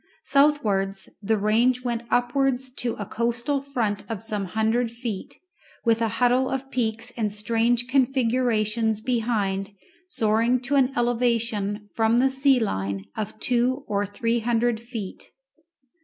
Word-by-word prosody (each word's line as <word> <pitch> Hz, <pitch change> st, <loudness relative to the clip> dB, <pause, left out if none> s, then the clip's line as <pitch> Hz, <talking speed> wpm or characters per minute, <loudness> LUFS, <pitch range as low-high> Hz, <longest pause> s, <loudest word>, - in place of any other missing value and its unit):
Southwards 205 Hz, -10 st, +2 dB
the 220 Hz, +2 st, +1 dB
range 235 Hz, +5 st, +2 dB
went 240 Hz, -2 st, -1 dB
upwards 255 Hz, +1 st, +1 dB
to 245 Hz, -2 st, -2 dB
a 205 Hz, -, -5 dB
coastal 235 Hz, +6 st, -1 dB
front 230 Hz, -7 st, -2 dB
of 225 Hz, -3 st, -3 dB
some 210 Hz, -3 st, -2 dB
hundred 220 Hz, +5 st, 0 dB
feet, 230 Hz, -4 st, -6 dB, 0.5 s
with 230 Hz, 0 st, +3 dB
a 225 Hz, -, +3 dB
huddle 250 Hz, +1 st, +3 dB
of 270 Hz, 0 st, -4 dB
peaks 230 Hz, 0 st, -1 dB
and 215 Hz, -3 st, -1 dB
strange 230 Hz, +3 st, +1 dB
configurations 235 Hz, -4 st, +1 dB
behind 215 Hz, -5 st, -1 dB, 0.3 s
soaring 230 Hz, -4 st, +2 dB
to 255 Hz, +3 st, -4 dB
an 270 Hz, -2 st, +4 dB
elevation 230 Hz, -4 st, 0 dB
from 225 Hz, +1 st, +2 dB
the 265 Hz, +2 st, +3 dB
sea 265 Hz, -1 st, +3 dB
line 100 Hz, -, -2 dB
of 215 Hz, 0 st, -5 dB
two 255 Hz, +2 st, +1 dB
or 205 Hz, 0 st, 0 dB
three 230 Hz, +4 st, -1 dB
hundred 235 Hz, 0 st, +1 dB
feet. 230 Hz, -5 st, -8 dB
235 Hz, 135 wpm, -25 LUFS, 215-250 Hz, 0.5 s, an